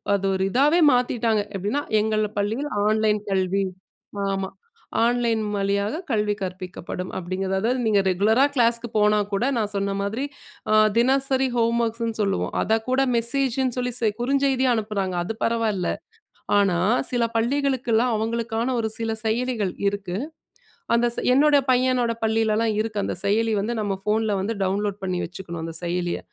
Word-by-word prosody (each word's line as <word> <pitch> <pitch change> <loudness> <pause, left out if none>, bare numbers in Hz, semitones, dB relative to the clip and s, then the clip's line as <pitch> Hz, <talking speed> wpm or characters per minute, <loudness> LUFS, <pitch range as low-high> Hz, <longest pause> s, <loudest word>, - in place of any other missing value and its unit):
அது 195 0 -2
ஒரு 190 0 0
இதாவே 295 +7 +4
மாத்திட்டாங்க. 235 -3 +1
எப்படீன்னா, 205 +10 -1 0.2
"எங்கள் 215 0 +1
பள்ளியில் 225 +9 -1 0.2
ஆன்லைன் 215 -1 +2
கல்வி" 190 0 +1 0.7
ஆமா. 195 -1 -2 0.5
"ஆன்லைன் 235 -2 +1
வழியாக 200 - 0
கல்வி 210 -1 +1
கற்பிக்கப்படும்." 185 -1 -5
அப்படீங்கிறது. 190 +1 -2
அதாவது 250 +3 +1
நீங்க 205 -2 +4
ரெகுலரா 220 +9 +3
கிளாஸ்க்கு 235 -1 +2
போனா 210 0 +4
கூட, 200 - +1
நான் 210 -2 -1
சொன்ன 200 0 -1
மாதிரி 220 +7 -2 0.5
அ - - +5 0.2
தினசரி 265 +1 +2
ஹோம்வொர்க்ஸ்ன்னு 230 -1 0
சொல்லுவோம். 195 -1 -1
அத 220 +1 +2
கூட 265 +1 +3
மெசேஜுன்னு 255 +1 0
சொல்லி 250 -1 -1
செ 225 -2 +2
குறுஞ்செய்தியா 265 -1 +2
அனுப்புறாங்க 200 -4 -2
அது 220 +5 -4
பரவாயில்ல. 225 -5 0 0.7
ஆனா, 190 -4 +2 0.3
சில 240 -1 +1
பள்ளிகளுக்கெல்லாம் 250 -1 +1
அவங்களுக்கான 230 +2 -1
ஒரு 220 -1 -1
சில 225 0 -1
செயலிகள் 220 -4 0
இருக்கு. 195 -2 -2 0.8
அந்த 240 +1 +3
செ - - -2
என்னோட 295 +1 +5 0.2
பையனோட 250 -2 +2
பள்ளிலல்லாம் 220 0 +1
இருக்கு, 215 -2 -3
அந்த - - -3
செயலி 220 +2 +2
வந்து 235 +3 -2
நம்ம 195 -2 -1
ஃபோன்ல 215 -1 +1
வந்து 220 +2 -2
டவுன்லோட் 200 +1 -1
பண்ணி 180 -1 -1
வச்சுக்கணும் 170 -2 -7
அந்த 165 0 -5
செயலிய. 175 0 -1
220 Hz, 140 wpm, -23 LUFS, 200-240 Hz, 0.8 s, அ